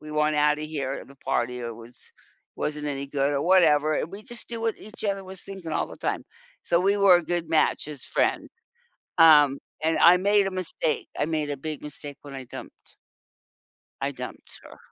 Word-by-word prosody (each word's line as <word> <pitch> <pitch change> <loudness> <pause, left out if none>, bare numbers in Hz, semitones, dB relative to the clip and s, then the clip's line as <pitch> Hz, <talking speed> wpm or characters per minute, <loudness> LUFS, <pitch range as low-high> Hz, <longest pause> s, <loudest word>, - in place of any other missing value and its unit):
we 150 - -10
want 150 0 +1
outta 150 0 +2
here, 140 -3 -4
the 140 - -17
party, 125 -2 -2
yeah, 120 -1 -5
was 115 +1 -13 0.6
wasn't 150 0 -3
any 140 -1 -3
good 140 0 0
or 140 - 0
whatever. 155 -4 +4
We 200 +4 -10
just 240 0 -7
do 230 -1 -5
what 225 -1 -1
each 215 +1 -10
other 195 -1 -1
was 190 0 +5
thinking 190 -5 -8
all - - 0
the - - -11
time. - - -3 0.4
So 170 - +1
we 200 +2 +2
were 195 -3 +6
a 175 - -1
good 175 -1 -2
match 155 -2 +2
as 150 -3 -7
friends. - - 0 0.7
Um, 150 -4 +7 0.3
and 160 +1 +1
I 175 +2 +7
made 200 +2 +3
a - - -3
mistake; 185 -4 -2
I - - +2
made 155 -2 -2
a 145 - -4
big 155 +2 -6
mistake 145 -1 -6
when 140 -1 -9
I 135 - -7
dumped - - -12 1.1
I - - -1
dumped - - -9
her. - - -14
155 Hz, 195 wpm, -25 LUFS, 145-185 Hz, 1.1 s, Um